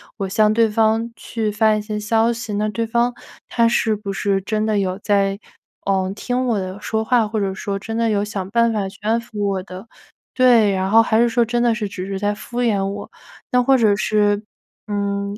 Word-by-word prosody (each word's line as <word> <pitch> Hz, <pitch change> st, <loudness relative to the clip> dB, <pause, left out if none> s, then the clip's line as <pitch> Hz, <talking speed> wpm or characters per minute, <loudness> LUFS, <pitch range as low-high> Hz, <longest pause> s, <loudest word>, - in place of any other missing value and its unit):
我 195 Hz, -3 st, -4 dB
向 215 Hz, +2 st, +3 dB
对 225 Hz, 0 st, +3 dB
方 225 Hz, +2 st, +1 dB
去 220 Hz, -2 st, -3 dB
发 215 Hz, +1 st, +3 dB
一 215 Hz, -, -2 dB
些 210 Hz, 0 st, -4 dB
消 225 Hz, +2 st, +2 dB
息， 230 Hz, -2 st, -5 dB
那 210 Hz, +1 st, 0 dB
对 230 Hz, +1 st, -2 dB
方 235 Hz, +2 st, +1 dB, 0.4 s
他 235 Hz, -1 st, +3 dB
是 230 Hz, -1 st, +1 dB
不 200 Hz, -1 st, -5 dB
是 195 Hz, 0 st, 0 dB
真 215 Hz, +1 st, -1 dB
的 215 Hz, -2 st, +1 dB
有 185 Hz, -1 st, -1 dB
在， 200 Hz, -1 st, +1 dB, 0.5 s
呃， 190 Hz, -1 st, +1 dB
听 250 Hz, +3 st, -2 dB
我 230 Hz, -3 st, +1 dB
的 190 Hz, 0 st, -5 dB
说 220 Hz, +1 st, -2 dB
话 235 Hz, -1 st, +2 dB
或 220 Hz, +1 st, -4 dB
者 195 Hz, -2 st, -1 dB
说 195 Hz, +1 st, -4 dB
真 225 Hz, +3 st, -5 dB
的 230 Hz, 0 st, +1 dB
有 205 Hz, -2 st, +1 dB
想 195 Hz, -3 st, -5 dB
办 235 Hz, +2 st, +2 dB
法 210 Hz, -3 st, -1 dB
去 190 Hz, -, -11 dB
安 220 Hz, +2 st, +1 dB
抚 225 Hz, -3 st, -6 dB
我 195 Hz, -2 st, -1 dB
的 185 Hz, +1 st, -10 dB, 0.5 s
对， 240 Hz, -5 st, +5 dB
然 190 Hz, 0 st, -1 dB
后 225 Hz, +3 st, +6 dB
还 225 Hz, -1 st, +2 dB
是 240 Hz, -, +4 dB
说 235 Hz, +1 st, +2 dB
真 240 Hz, +1 st, -1 dB
的 235 Hz, -2 st, +2 dB
是 215 Hz, -3 st, -3 dB
只 185 Hz, -1 st, -6 dB
是 195 Hz, -1 st, -3 dB
在 205 Hz, +1 st, 0 dB
敷 240 Hz, +3 st, -5 dB
衍 205 Hz, -5 st, +1 dB
我。 200 Hz, +1 st, -6 dB, 0.4 s
那 250 Hz, -, +4 dB
或 265 Hz, +2 st, +4 dB
者 220 Hz, -4 st, +4 dB
是， 205 Hz, -1 st, +1 dB, 0.5 s
嗯， 200 Hz, 0 st, -2 dB
215 Hz, 240 characters per minute, -20 LUFS, 200-230 Hz, 0.5 s, 后